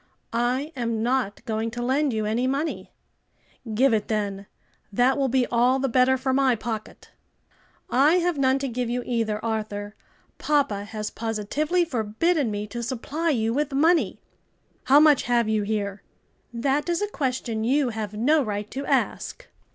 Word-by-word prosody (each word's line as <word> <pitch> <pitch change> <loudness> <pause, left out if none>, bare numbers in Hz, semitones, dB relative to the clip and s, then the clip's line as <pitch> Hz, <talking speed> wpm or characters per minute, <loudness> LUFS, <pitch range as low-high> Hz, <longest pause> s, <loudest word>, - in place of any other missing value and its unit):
"I 250 +6 0
am 230 -3 -2
not 245 -4 -1
going 220 0 -1
to 240 +1 -5
lend 275 +3 +1
you 220 -2 -1
any 230 +4 0
money." 280 +5 -2 0.8
"Give 260 +2 +4
it 215 -2 0
then; 200 -2 -2 0.4
that 245 +6 +3
will 275 -1 +1
be 260 0 +2
all 245 +2 +2
the 270 0 0
better 255 +1 +3
for 260 0 -1
my 265 -2 +3
pocket. 220 -1 -6 0.8
"I 285 +7 +4
have 355 -1 +1
none 265 -1 +2
to 275 0 -2
give 245 -1 -3
you 245 +1 -2
either, 225 -3 -1
Arthur; 210 -2 -3 0.5
papa 270 -10 +1
has 215 0 -5
positively 235 - -1
forbidden 260 +3 0
me 205 0 -3
to 235 +3 -6
supply 275 +7 -2
you 225 -6 +1
with 290 +1 -1
money." 325 +5 +3 0.7
"How 280 +2 +7
much 300 -2 +6
have 235 -2 +3
you 215 -1 +1
here?" 205 -1 -2 0.5
"That 270 +7 0
is 345 +4 0
a - - 0
question 255 - -2
you 265 +3 +2
have 215 -2 -5
no 290 +8 +3
right 210 -3 -4
to 275 - -4
ask." - - -1
245 Hz, 165 wpm, -25 LUFS, 220-275 Hz, 0.8 s, How